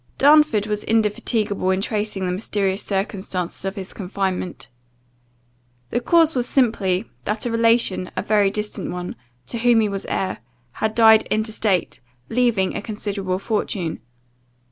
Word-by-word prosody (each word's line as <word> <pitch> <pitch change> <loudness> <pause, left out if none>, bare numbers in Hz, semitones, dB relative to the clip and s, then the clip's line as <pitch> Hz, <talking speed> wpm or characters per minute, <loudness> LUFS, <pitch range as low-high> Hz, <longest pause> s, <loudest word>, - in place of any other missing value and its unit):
Darnford 290 -7 +5
was 210 -1 -2
indefatigable 215 -2 0
in 190 0 +2
tracing 205 -2 -2
the 180 - -1
mysterious 195 0 -1
circumstances 190 -3 -3
of 195 +1 -3
his 195 -2 -6
confinement. 185 - -3 1.2
The - - +1
cause 325 +5 +4
was 245 -2 0
simply, 215 -6 +1 0.2
that 210 +2 -1
a 240 - -1
relation, 230 -5 +2
a - - 0
very 205 -2 +3
distant 210 +1 -4
one, 180 0 -5 0.3
to 235 - -5
whom 240 -1 +4
he 215 - +2
was 200 -1 -4
heir, 185 -9 -2 0.3
had 220 - -2
died 220 -1 +6
intestate, 215 -3 0 0.3
leaving 225 -6 +1
a - - -2
considerable 205 -3 -3
fortune. 195 -5 -2
210 Hz, 140 wpm, -22 LUFS, 190-225 Hz, 1.2 s, died